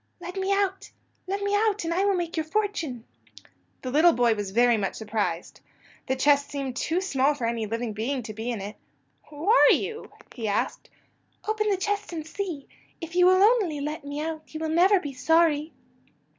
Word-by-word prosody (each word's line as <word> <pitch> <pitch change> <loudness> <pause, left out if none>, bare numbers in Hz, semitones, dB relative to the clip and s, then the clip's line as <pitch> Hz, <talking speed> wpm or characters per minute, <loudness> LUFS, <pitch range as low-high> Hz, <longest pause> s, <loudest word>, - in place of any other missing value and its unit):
"Let 355 +1 -8
me 385 0 -1
out! 395 -1 0 0.4
Let 400 +2 -2
me 405 0 0
out, 420 -1 +2
and 330 0 -1
I 370 +3 +1
will 400 -1 +3
make 345 -2 -3
your 320 - 0
fortune." 320 - -2 0.8
The 255 - -3
little 320 +5 +5
boy 240 -2 +3
was 205 -2 -4
very 240 +4 +4
much 200 -3 -2
surprised. 205 -6 -3 0.5
The 260 - +1
chest 285 +1 +3
seemed 275 -3 -4
too 330 +7 -1
small 290 -6 +1
for 250 - -3
any 230 -1 -1
living 230 +1 -3
being 245 +5 -2
to 215 -1 -7
be 220 +3 -5
in 230 -5 -3
it. 205 +2 -7 0.5
"Who 300 +4 -8
are 455 +4 +7
you?" 450 0 -1 0.2
he 225 -3 -4
asked. 205 0 -2 0.6
"Open 430 0 0
the 395 - +2
chest 410 +1 -2
and 315 -2 -5
see. 325 -4 -5 0.3
If 330 +1 -8
you 360 0 +6
will 370 +1 +5
only 410 -9 +3
let 300 +2 -4
me 285 +1 -5
out 315 0 -5
you - - -3
will 320 0 -2
never 365 +5 +4
be 290 -5 -6
sorry." 315 +2 +2
310 Hz, 200 wpm, -26 LUFS, 245-380 Hz, 0.8 s, are